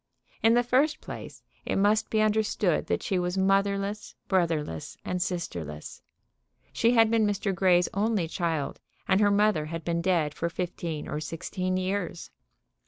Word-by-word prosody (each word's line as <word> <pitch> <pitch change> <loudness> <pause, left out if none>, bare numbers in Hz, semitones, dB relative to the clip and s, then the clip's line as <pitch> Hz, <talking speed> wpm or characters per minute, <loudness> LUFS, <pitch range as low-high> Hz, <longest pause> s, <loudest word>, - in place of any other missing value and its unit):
In 225 +1 +5
the 245 - +4
first 265 +6 +2
place, - - -9 0.2
it - - -2
must 210 +2 +2
be 220 - +2
understood 215 -5 +1
that - - -1
she 190 - 0
was 180 +1 -2
motherless, 200 +2 0
brotherless 160 - -1
and 180 0 -2
sisterless. 85 - -4 0.7
She 235 +1 +3
had 225 -1 +5
been 225 -2 +3
Mr. 200 -1 -1
Grey's 180 -1 +3
only 205 -3 +1
child, 160 -4 -2 0.3
and 190 - +3
her 205 - +5
mother 200 -6 +2
had 165 +1 -5
been 170 0 0
dead 170 -5 +1
for 170 - -2
fifteen 170 -2 -4
or 150 - -3
sixteen 185 +4 -3
years. 185 -2 -3
185 Hz, 155 wpm, -27 LUFS, 170-210 Hz, 0.7 s, In